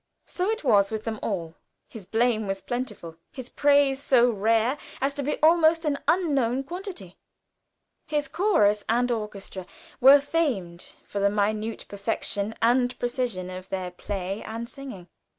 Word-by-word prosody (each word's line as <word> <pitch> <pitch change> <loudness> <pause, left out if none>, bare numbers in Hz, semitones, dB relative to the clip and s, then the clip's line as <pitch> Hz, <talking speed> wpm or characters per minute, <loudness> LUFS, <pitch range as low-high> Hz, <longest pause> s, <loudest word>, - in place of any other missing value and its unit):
So 370 +3 -2
it 445 -4 -2
was 205 -7 +4
with 220 -1 -4
them 220 -2 -4
all. 170 -6 -3 0.3
His 205 -5 -11
blame 225 -2 +1
was 195 0 -2
plentiful; 240 -10 -5
his 260 -2 -8
praise 285 -1 +3
so 245 -3 +4
rare 225 +6 +1 0.2
as 275 +1 0
to 285 - -3
be 290 +2 -1
almost 325 0 +5
an 285 -2 0
unknown 275 -8 +2
quantity. 345 - -8 0.9
His 300 -1 -1
chorus 210 - +2
and 245 +2 +2
orchestra 200 -4 -5 0.3
were 275 +3 +8
famed 255 - -2
for 200 - -4
the 200 0 +3
minute 215 +2 -1
perfection 200 +1 -2
and 245 +1 +2
precision 240 -7 -2
of 185 +1 -8
their 185 -2 -3
play 195 +2 -4
and 230 +1 -6
singing. 245 -10 -9
230 Hz, 150 wpm, -26 LUFS, 200-280 Hz, 0.9 s, were